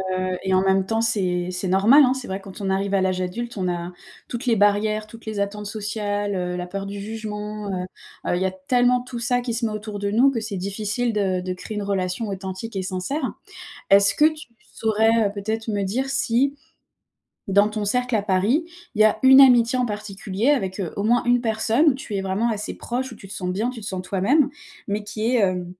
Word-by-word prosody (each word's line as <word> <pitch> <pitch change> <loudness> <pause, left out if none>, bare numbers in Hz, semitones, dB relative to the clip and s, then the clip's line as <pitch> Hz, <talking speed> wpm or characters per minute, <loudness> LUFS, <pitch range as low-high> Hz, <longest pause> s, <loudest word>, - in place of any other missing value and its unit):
heu 185 0 -1
et 190 0 0
en 185 - +4
même 190 0 +2
temps, 225 +2 0
c'est 180 -6 0
c'est 180 +1 -3
normal 215 +11 +6
hein. 255 - +2
C'est 260 -1 -6
vrai 190 +1 -3
quand 195 +1 -11
on 195 - -1
arrive 195 +1 0
à 195 - +3
l'âge 185 -1 0
adulte, 220 +6 -4
on 185 -1 -1
a 175 0 -3 0.4
toutes 240 +2 -5
les 235 - +3
barrières, 215 +1 +2
toutes 230 +2 -14
les 215 -2 -4
attentes 205 +1 -3
sociales, 205 -1 -2
heu, 180 -1 -2
la 180 0 -4
peur 195 +2 -5
du 200 0 -6
jugement, 210 -1 -5
heu 180 -1 -3 0.5
heu, - - +2
il 180 - -2
y - - +1
a 190 - 0
tellement 245 +6 +2
tout 250 -1 -7
ça 245 +1 0
qui 240 -2 -3
se 235 0 -1
met 220 - -1
autour 215 0 -5
de 200 0 -2
nous 245 +6 +5
que 250 - -2
c'est 215 -2 -5
difficile 215 +5 -2
de 190 -3 0
de 185 0 -3
créer 210 +3 -7
une 205 - -2
relation 195 +2 -2
authentique 190 +3 -6
et 190 - -1
sincère. 190 +11 -3 0.6
Est-ce 200 0 +6
que 300 - +4
tu 310 -5 0 0.2
saurais 220 -1 +2
peut-être 220 +2 -3
me 205 -2 0
dire 255 +8 -1
si, 270 +1 +1 0.9
dans 200 +2 +4
ton 215 -1 -3
cercle 250 +3 +1
à 210 - 0
Paris, 205 - +2 0.3
il 215 - +4
y - - +6
a 215 - +3
une 265 +1 +9
amitié 245 -1 +5
en 250 - +2
particulier 210 0 -3
avec, 200 -9 +1
heu, 175 - -4
au 200 - -1
moins 240 +3 +2
une 245 0 +3
personne 225 +6 +2
où - - 0
tu 250 -5 -7
es 195 - -1
vraiment 195 +5 0
assez 210 -2 -3
proche, 250 +1 -4
où - - -10
tu 195 - -13
te 190 - -8
sens 180 -1 -3
bien, 215 +6 -1
tu 240 -3 -6
te 205 - -7
sens 190 -2 -3
toi-même, 205 +11 +2 0.4
mais 205 +1 -1
qui 215 +1 -4
est, 215 - +4
heu, 180 -2 -1
210 Hz, 235 wpm, -23 LUFS, 195-235 Hz, 0.9 s, une